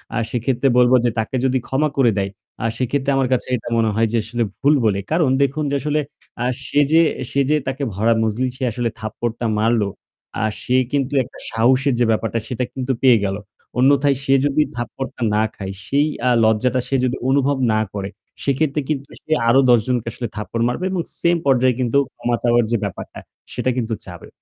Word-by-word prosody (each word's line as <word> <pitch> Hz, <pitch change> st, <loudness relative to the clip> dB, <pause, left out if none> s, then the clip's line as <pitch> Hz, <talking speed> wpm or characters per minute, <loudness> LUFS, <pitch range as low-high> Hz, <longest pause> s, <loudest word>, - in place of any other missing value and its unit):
আর 115 Hz, -, 0 dB
সেক্ষেত্রে 125 Hz, +2 st, 0 dB
বলব 125 Hz, 0 st, +5 dB
যে -, -, +4 dB
তাকে 110 Hz, +4 st, -2 dB
যদি 130 Hz, 0 st, +2 dB
ক্ষমা 150 Hz, +3 st, +1 dB
করে 125 Hz, -4 st, +4 dB
দেয় 100 Hz, 0 st, -1 dB, 0.3 s
আ -, -, 0 dB
সেক্ষেত্রে 135 Hz, +3 st, 0 dB
আমার 130 Hz, -2 st, +1 dB
কাছে 125 Hz, -, -1 dB
এটা 115 Hz, -, -6 dB
মনে 115 Hz, -1 st, +2 dB
হয় 115 Hz, +1 st, +2 dB
যে -, -, +3 dB
আসলে 120 Hz, +2 st, -2 dB, 0.2 s
ভুল 145 Hz, +2 st, +4 dB
বলে। 100 Hz, -3 st, +2 dB
কারণ 160 Hz, -3 st, +3 dB
দেখুন 140 Hz, +3 st, -1 dB
যে -, -, +1 dB
আসলে 150 Hz, +2 st, 0 dB, 0.4 s
আ -, -, 0 dB, 0.2 s
সে 145 Hz, -, +1 dB
যে 165 Hz, +1 st, +6 dB, 0.3 s
সে 140 Hz, -, +2 dB
যে 155 Hz, -, +4 dB
তাকে 135 Hz, +2 st, -3 dB
ভরা 110 Hz, +5 st, +2 dB
মজলিসে 125 Hz, +4 st, -2 dB
আসলে 120 Hz, +1 st, -1 dB
থাপ্পড়টা 115 Hz, +2 st, -4 dB
মারল। 115 Hz, +1 st, +2 dB, 0.6 s
আ -, -, +2 dB, 0.2 s
সে 125 Hz, -, 0 dB, 0.2 s
কিন্তু 140 Hz, -1 st, -1 dB
একটা -, -, -14 dB
সাহসের 130 Hz, +4 st, +2 dB
যে 120 Hz, -, +4 dB
ব্যাপারটা 115 Hz, +1 st, 0 dB
সেটা 125 Hz, 0 st, -2 dB
কিন্তু 130 Hz, 0 st, -2 dB
পেয়ে 125 Hz, -4 st, +6 dB
গেল। 100 Hz, 0 st, -2 dB, 0.4 s
অন্যথায় 140 Hz, +1 st, +4 dB
সে 135 Hz, -, +2 dB
যদি 145 Hz, +1 st, +2 dB
থাপ্পড়টা 125 Hz, +2 st, -6 dB
না 110 Hz, -, +3 dB
খায় 95 Hz, -1 st, -6 dB
সেই 145 Hz, +2 st, +2 dB, 0.2 s
আ -, -, +5 dB
লজ্জাটা 110 Hz, +4 st, +2 dB
সে 135 Hz, -, -1 dB
যদি 125 Hz, +1 st, -1 dB
অনুভব 140 Hz, +1 st, +2 dB, 0.2 s
না 110 Hz, -, +2 dB
করে। 100 Hz, -1 st, -4 dB, 0.3 s
সেক্ষেত্রে 140 Hz, +2 st, 0 dB
কিন্তু 140 Hz, -2 st, -2 dB
সে -, -, -12 dB, 0.2 s
আরও 135 Hz, +3 st, +6 dB
১০ 120 Hz, -1 st, +6 dB
জনকে 125 Hz, -3 st, -1 dB
আসলে 120 Hz, -1 st, -4 dB
থাপ্পড় 110 Hz, +2 st, -3 dB
মারবে 125 Hz, +9 st, -2 dB
এবং 185 Hz, -2 st, -1 dB, 0.2 s
same 170 Hz, 0 st, +3 dB
পর্যায়ে 130 Hz, -2 st, +3 dB
কিন্তু 125 Hz, +1 st, +1 dB, 0.2 s
ক্ষমা 120 Hz, 0 st, -1 dB
চাওয়ার 120 Hz, -1 st, +3 dB
যে 115 Hz, -, +3 dB
ব্যাপারটা 100 Hz, -3 st, -6 dB, 0.3 s
সেটা -, -, -1 dB
কিন্তু 115 Hz, -2 st, -1 dB
চাবে। 90 Hz, -2 st, -10 dB
125 Hz, 195 wpm, -20 LUFS, 115-140 Hz, 0.6 s, যে